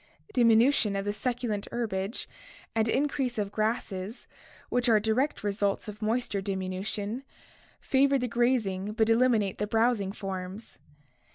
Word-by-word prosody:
Diminution 230 -2 +4
of 195 0 -2
the 205 - 0
succulent 235 -3 -2
herbage 210 -2 -2 0.5
and 225 0 +2
increase 270 -1 0
of 205 -2 -1
grasses, 215 -1 -2 0.4
which 245 0 +1
are 220 -2 +6
direct 225 +7 0
results 200 0 0
of 210 +1 -8
moisture 220 -2 0
diminution, 195 +4 -3 0.6
favor 275 +1 +3
the 250 -1 -1
grazing 220 -5 +1
but 220 0 +2
eliminate 225 -5 +3
the 210 - 0
browsing 225 -3 +2
forms. 195 +1 -6
220 Hz, 125 wpm, -29 LUFS, 200-240 Hz, 0.6 s, are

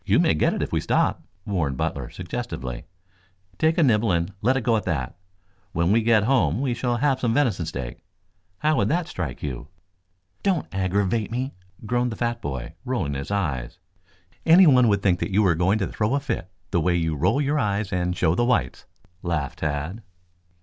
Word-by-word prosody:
"You - - +3
may - - +4
get 75 - +1
it - - -1
if - - -5
you - - +2
stop," - - +1 0.2
warned 80 -10 -1
Butler - - -2
suggestively. 85 - -5 0.7
"Take 160 +2 +2
a 170 - +5
nibble 115 -5 +3
and 85 +2 0
let 130 +4 +3
it 130 - -2
go 115 -1 +3
at 105 - -1
that. 70 -8 -2 0.6
When 85 +2 +1
we 115 +2 +4
get 110 -2 +4
home 125 -1 +2
we 130 -2 0
shall 120 0 -1
have 135 +1 +1
some 115 -3 0
venison 115 - +1
steak. 65 -6 -6 0.5
How 155 +6 +1
would - - +2
that 170 +2 0
strike 80 - -5
you?" 65 -2 -5 0.7
"Don't 185 -6 +1
aggravate 95 +3 0
me," 130 +4 -3 0.3
groaned 120 +2 0
the - - -4
fat 120 0 -2
boy, 65 0 -5
rolling 115 - -2
his 70 0 -5
eyes. 75 -12 -2 0.7
"Anyone 160 -8 +7
would 100 -2 +2
think 90 -3 +2
you 100 +2 +2
were 95 -3 +4
going 90 +6 +2
to 100 - 0
throw 110 +7 -1
a - - +2
fit 135 - -4 0.2
the 85 - +2
way 85 +2 +2
you 80 -2 0
roll 90 - +2
your 145 +1 +1
eyes 105 -4 -1
and 90 0 -1
show 80 -2 +2
the 105 - +1
whites," 120 - 0 0.4
laughed 85 -6 -2
Tad. 75 +8 -3
100 Hz, 190 wpm, -24 LUFS, 85-125 Hz, 0.7 s, Anyone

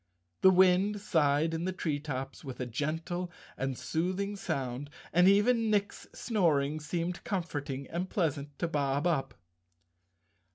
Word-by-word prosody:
The 190 - +8
wind 190 +2 +4
sighed 160 -4 +2
in 165 +1 -2
the 185 - 0
tree 160 -5 -2
tops 135 -2 -5
with 130 -3 -7
a 125 - -1
gentle 165 +8 -3 0.2
and 135 -1 -2
soothing 185 +5 -1
sound, 140 -7 -3 0.2
and 180 +2 +6
even 220 +3 +4
Nick's 205 -1 0
snoring 155 - +1
seemed 170 +3 -3
comforting 145 -8 -3
and 175 +6 -3
pleasant 145 -5 -1
to 170 - -1
Bob 145 -1 0
Up. 160 -6 0
165 Hz, 135 wpm, -31 LUFS, 145-185 Hz, 0.2 s, The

